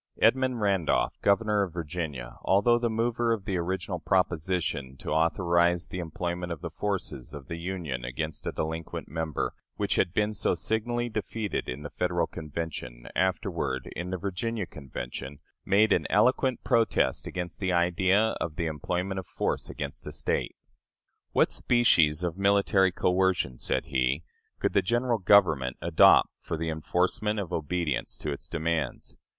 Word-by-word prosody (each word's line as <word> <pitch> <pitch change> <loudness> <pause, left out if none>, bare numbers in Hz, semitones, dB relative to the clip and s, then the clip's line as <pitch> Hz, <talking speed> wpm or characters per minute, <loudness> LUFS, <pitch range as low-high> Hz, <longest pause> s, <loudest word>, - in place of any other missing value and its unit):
Edmund 125 +1 +3
Randolph, 95 -6 +1
Governor 105 +1 +3
of 95 -4 -2
Virginia, 75 -7 -5
although 110 +5 +4
the 120 -1 0
mover 115 +1 0
of 105 -4 -1
the 100 -4 -1
original 90 +1 -2
proposition 85 -7 0
to - - -6
authorize 85 +2 +2
the 90 - -5
employment 85 +1 -3
of 85 - -5
the 85 - -5
forces 95 -9 -3
of 70 -1 -9
the 85 -1 -4
Union 85 -8 -4
against 75 +6 -4
a - - 0
delinquent 80 +1 -4
member, 80 0 -2 0.2
which - - 0
had 90 - +2
been 105 +3 +1
so 105 - +1
signally 120 +2 -1
defeated 110 -1 -3
in 65 +4 -5
the 75 - -7
Federal 90 -2 0
Convention, 75 -7 -6
afterward, 90 -7 -1
in 85 +2 -4
the 95 - -2
Virginia 100 +3 -2
Convention, 65 -1 -7 0.3
made 105 +2 +4
an - - +1
eloquent 125 +3 +3
protest 115 -3 +2
against 90 -2 -5
the 95 -2 0
idea 95 +5 +3
of 80 - -2
the 85 - -1
employment 90 +5 -2
of 95 - -8
force - - -2
against - - -6
a - - -4
State. - - -1 0.8
"What - - +3
species 85 -10 +4
of 90 +1 -2
military 100 -1 +4
coercion," 90 -8 +1
said - - -1
he, 65 +4 0 0.3
"could - - 0
the - - +4
General 120 +2 +1
Government 80 -10 +4
adopt 85 -2 +6
for 85 - -4
the 80 +1 -2
enforcement 90 +6 0
of 95 -4 -4
obedience 80 -2 -1
to 75 - -3
its 75 +3 -6
demands? 80 -4 -2
90 Hz, 155 wpm, -28 LUFS, 80-100 Hz, 0.8 s, adopt